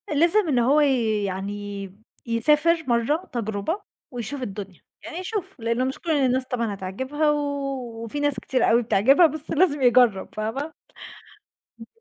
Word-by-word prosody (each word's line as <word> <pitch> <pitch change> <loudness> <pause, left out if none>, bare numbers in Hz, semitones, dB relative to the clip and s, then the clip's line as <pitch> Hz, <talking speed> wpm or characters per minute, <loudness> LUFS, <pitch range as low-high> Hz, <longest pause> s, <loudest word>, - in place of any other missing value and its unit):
لازم 345 +6 +3
إن 265 -5 +2
هو 270 +6 +4
يعني 205 -6 -1 0.3
يسافر 300 +8 +2
مرّة 245 +9 0
تجربة، 225 - -2 0.3
ويشوف 245 +3 -5
الدنيا، 195 -5 -7 0.2
يعني 330 +1 -7
يشوف 375 - -5
لأن 235 +3 0
مش 265 - -5
كُل 335 - -3
الناس 260 -3 +2
طبعًا 235 -5 -2
هتعجبها 260 +11 -1
وفي 275 -4 -3
ناس 290 -2 0
كتير 255 -2 +1
أوي 235 +1 +4
بتعجبها 245 - +5
بس 310 0 -7
لازم 310 -3 +2
يجرّب 245 -6 +4
فاهمة؟ 245 +9 -3 1.1
إمم. 225 - -11
255 Hz, 135 wpm, -24 LUFS, 225-295 Hz, 1.1 s, بتعجبها